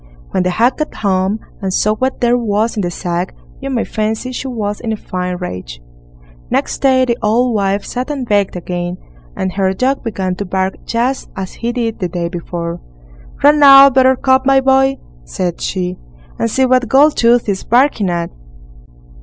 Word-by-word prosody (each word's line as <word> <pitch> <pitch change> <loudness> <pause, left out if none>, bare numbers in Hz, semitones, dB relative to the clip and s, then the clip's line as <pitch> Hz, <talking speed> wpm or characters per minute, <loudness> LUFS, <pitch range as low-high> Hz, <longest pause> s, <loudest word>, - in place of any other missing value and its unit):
When - - 0
the 180 - 0
hag 230 +8 +2
got 305 - -4
home 190 0 0 0.2
and 190 -1 -2
saw 210 +3 +2
what 260 +4 -2
there 240 0 +3
was 225 -1 0
in 210 - -1
the 175 - -1
sack, 175 +1 -3 0.2
you 275 - -5
may 250 -4 0
fancy 220 +3 -2
she 255 +1 -5
was 210 -5 -3
in 230 - -4
a 220 - -2
fine 180 -2 -4
rage. 90 - -7 0.7
Next - - -1
day 260 -1 +4
the 235 -1 -1
old 235 +3 +2
wife 200 -1 0
sat 250 +3 -4
and 275 -4 -4
baked 205 -3 +1
again, 175 0 -4 0.4
and 190 - -2
her 190 -1 +1
dog 260 +7 0
began 195 -5 -2
to 205 - -4
bark 190 0 -1
just 245 +3 -1
as 190 -1 -5
he 235 +1 -3
did 235 -2 -3
the 180 -3 -2
day 170 0 -3
before. 170 -1 -5 0.6
"Run 295 +1 +5
out, 275 -1 +9
Buttercup, 260 0 +3
my 270 0 +4
boy", 270 0 +3 0.3
said 175 - -4
she, 180 -1 -3 0.4
"and 230 - 0
see 265 +4 +2
what 255 -1 +2
Goldtooth 245 -4 +4
is 195 -2 -2
barking 240 -5 +2
at." 170 -1 -2
220 Hz, 180 wpm, -16 LUFS, 185-255 Hz, 0.7 s, out